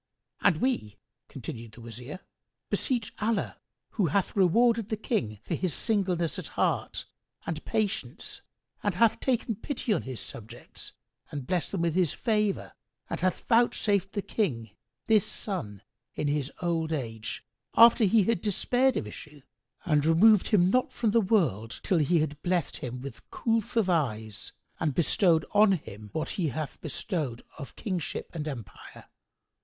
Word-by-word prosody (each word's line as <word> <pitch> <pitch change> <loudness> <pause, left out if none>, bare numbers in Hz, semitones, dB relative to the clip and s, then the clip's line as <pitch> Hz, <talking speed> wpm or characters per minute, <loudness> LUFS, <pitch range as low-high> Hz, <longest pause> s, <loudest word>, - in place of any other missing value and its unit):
"And - - +4
we," 240 - 0 0.3
continued 115 -2 -8
the 120 - -12
Wazir, 120 - -8 0.5
"beseech 240 -6 -1
Allah 220 +1 0 0.3
(who 195 -6 +1
hath 185 +5 0
rewarded 225 +3 +4
the 220 - -1
King 120 - -1
for - - -3
his 185 -5 0
singleness 185 - 0
of - - -6
heart - - -1 0.4
and 165 -2 -4
patience 200 - -2 0.4
and 205 -3 0
hath 225 +3 +4
taken 245 -3 0
pity 250 -4 -1
on 180 - 0
his 130 -3 -6
subjects 115 +2 -9 0.4
and 140 -3 -5
blessed 180 +6 -1
them 190 - 0
with 170 -2 +1
His 180 -3 +2
favour 210 -3 0 0.4
and - - -2
hath 185 0 0
vouchsafed 210 -5 +2
the 205 -2 -2
King 120 - -1 0.3
this 215 -3 +5
son 110 - -4 0.3
in 150 - -1
his 145 -1 0
old 165 -2 0
age, 115 -7 -4 0.3
after 230 0 +8
he 210 +2 +5
had 230 -2 +1
despaired 250 +6 +2
of - - -2
issue 145 +7 -10 0.4
and 150 -4 +3
removed 185 +6 +6
him 185 -3 +4
not 255 +2 +2
from 225 -3 0
the 230 +1 +4
world, 155 - +1
till 180 - +2
He 160 +2 +3
had 150 -1 -3
blessed 180 -1 0
him 125 0 -5
with 135 -3 -9
coolth 230 0 -1
of 220 -4 +3
eyes 110 - -1 0.3
and 150 -5 0
bestowed 170 -1 +3
on 210 -1 +6
him 105 - -6
what 155 - -2
He 165 - +2
hath 150 +2 -4
bestowed 150 - -3 0.2
of 140 - -8
Kingship 185 -6 -3
and 155 -3 -4
Empire!) 115 - -8
175 Hz, 155 wpm, -28 LUFS, 140-215 Hz, 0.5 s, after